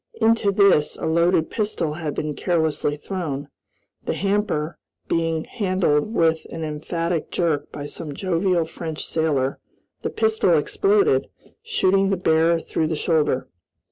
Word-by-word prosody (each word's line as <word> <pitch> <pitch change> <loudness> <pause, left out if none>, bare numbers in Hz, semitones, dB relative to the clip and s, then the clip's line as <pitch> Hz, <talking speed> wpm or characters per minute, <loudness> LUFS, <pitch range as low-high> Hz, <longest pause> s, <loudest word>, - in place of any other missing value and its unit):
Into 225 -2 +3
this, 195 -7 +4
a - - -4
loaded 170 0 +2
pistol 205 -8 -1
had 155 -2 -4
been 150 -1 -2
carelessly 160 -3 0
thrown. 150 -4 -4 0.5
The - - -2
hamper 195 -6 -1 0.3
being 165 -1 0
handled 185 -5 0
with 160 -1 +2
an 165 - -5
emphatic 165 +2 -2
jerk 155 -5 -1
by 145 - -6
some 145 -1 -6
jovial 180 -1 +1
French 160 -1 -6
sailor, 145 -4 0 0.4
the - - -2
pistol 445 0 +2
exploded, 405 0 +2 0.3
shooting 195 - +2
the 195 - +1
bearer 165 -1 +3
through 160 0 -1
the 160 - -1
shoulder. 155 -5 +1
165 Hz, 135 wpm, -23 LUFS, 155-190 Hz, 0.5 s, this